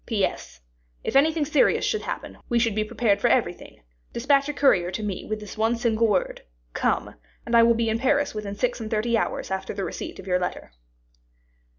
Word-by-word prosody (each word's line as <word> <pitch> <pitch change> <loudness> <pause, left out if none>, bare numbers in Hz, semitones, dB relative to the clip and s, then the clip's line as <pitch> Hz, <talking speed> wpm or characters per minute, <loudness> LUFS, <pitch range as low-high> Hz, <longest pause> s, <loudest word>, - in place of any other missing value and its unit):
"P. 215 -5 +2
S. - - -7 0.4
If - - -3
anything 310 +2 +4
serious 295 -1 +3
should 435 - 0
happen - - -6
we 240 - +2
should 230 -2 +2
be 215 +1 0
prepared 210 -2 0
for - - +3
everything, - - -1 0.3
dispatch 275 +3 +2
a - - -2
courier 230 -12 +3
to 190 +4 -4
me 200 -3 -4
with 215 0 -3
this 210 +1 -10
one 225 +2 +2
single 230 -1 +1
word, 195 -4 0 0.3
'come,' - - 0 0.3
and 235 - 0
I 230 - +8
will 230 0 +5
be 230 0 0
in 220 +1 0
Paris 285 +3 +1
within 210 -2 -5
six 245 +4 -1
and 220 -1 -5
thirty 225 +2 0
hours 225 - -2
after 190 0 -3
the 195 - -3
receipt - - -6
of 190 - -10
your 180 -1 +1
letter." 180 - -4
225 Hz, 210 wpm, -25 LUFS, 205-250 Hz, 0.4 s, I